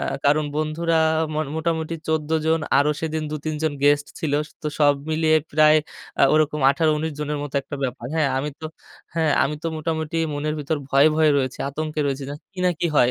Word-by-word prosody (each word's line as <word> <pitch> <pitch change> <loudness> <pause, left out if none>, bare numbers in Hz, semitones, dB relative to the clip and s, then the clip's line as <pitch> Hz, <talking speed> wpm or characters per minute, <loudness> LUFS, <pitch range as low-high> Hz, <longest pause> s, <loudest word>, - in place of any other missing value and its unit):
আ - - -4 0.2
কারণ 150 +2 +3
বন্ধুরা 160 +2 0 0.4
ম - - -3 0.2
মোটামুটি 160 0 -1
১৪ 155 -1 -1 0.2
জন 160 0 +2 0.2
আরো 145 +1 +3
সেদিন 160 -1 -2
২ 155 - -3
৩ 155 - -1
জন 155 - +1
গেস্ট 145 0 +4
ছিল। 150 -3 -2 0.3
তো - - -3
সব 145 -1 +5 0.2
মিলিয়ে 155 0 +3 0.2
প্রায় 155 +1 +6 0.6
ওরকম 155 0 +2
১৮-১৯ 155 +1 0
জনের 150 0 -2
মতো 145 -1 -7
একটা 145 - -7
ব্যাপার। 125 -1 -4
হ্যাঁ 155 -4 +2
আমি 145 +3 -2
তো 160 - -4 0.5
হ্যাঁ 160 -3 +2
আমি 150 +2 0
তো - - -2
মোটামুটি 160 0 -3 0.2
মনের 150 +1 -2
ভিতর 150 +2 -1
ভয়ে, 140 +3 +5
ভয়ে 155 -1 +4
রয়েছি, 130 -2 -1
আতঙ্কে 155 +2 -3
রয়েছি 140 0 -2
জ 145 - -5 0.2
কি 190 - -15
না 180 - +4
কি - - +2
হয় 125 -2 +5
155 Hz, 195 wpm, -23 LUFS, 145-160 Hz, 0.6 s, প্রায়